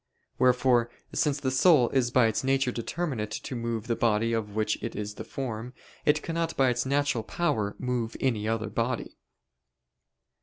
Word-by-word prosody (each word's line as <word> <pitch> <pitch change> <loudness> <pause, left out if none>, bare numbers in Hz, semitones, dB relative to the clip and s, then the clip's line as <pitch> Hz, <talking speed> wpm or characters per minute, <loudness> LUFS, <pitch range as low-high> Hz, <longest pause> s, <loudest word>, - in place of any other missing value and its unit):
Wherefore, 125 -2 +4 0.2
since 145 -2 +1
the 130 -2 -1
soul 130 -2 +5
is 130 -3 +2
by 125 -1 +4
its 110 +2 0
nature 135 -1 +2
determinate 120 -2 -3
to 110 +4 -5
move 115 -2 -3
the 120 -1 0
body 115 0 +1
of 105 -2 -2
which 110 0 0
it - - -4
is 105 0 -4
the - - -7
form, 125 -1 -5 0.3
it 150 +1 +3
cannot 165 0 -2
by 135 -1 +4
its 120 +1 -1
natural 140 -4 +1
power 110 -9 -1
move 125 -3 -2
any 110 -5 0
other 110 -2 -1
body. 115 +2 -2
120 Hz, 165 wpm, -28 LUFS, 115-135 Hz, 0.3 s, soul